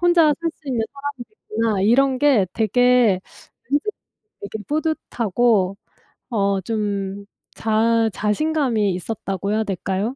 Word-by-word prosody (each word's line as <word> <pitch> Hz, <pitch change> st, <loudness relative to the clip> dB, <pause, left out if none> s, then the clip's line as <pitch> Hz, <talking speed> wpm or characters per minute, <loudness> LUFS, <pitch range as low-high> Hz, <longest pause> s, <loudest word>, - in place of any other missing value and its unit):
혼자 340 Hz, -4 st, +5 dB
살 335 Hz, -, 0 dB
수 295 Hz, -, -14 dB
있는 245 Hz, -4 st, 0 dB
사람이 280 Hz, -3 st, -6 dB
됐구나' 225 Hz, -, -2 dB
이런 260 Hz, +5 st, +3 dB
게 260 Hz, -9 st, +4 dB
되게 235 Hz, -2 st, +3 dB, 0.5 s
왠지 290 Hz, -, +3 dB, 0.6 s
이렇게 200 Hz, +2 st, -5 dB
뿌듯하고 235 Hz, -, +1 dB, 0.6 s
어 200 Hz, -3 st, +1 dB
좀 200 Hz, -1 st, -3 dB, 0.3 s
자 225 Hz, +1 st, +2 dB
자신감이 230 Hz, -1 st, +1 dB
있었다고 195 Hz, 0 st, -4 dB
해야 220 Hz, -, +1 dB
될까요? 195 Hz, +4 st, -2 dB
225 Hz, 250 characters per minute, -21 LUFS, 200-270 Hz, 0.6 s, 혼자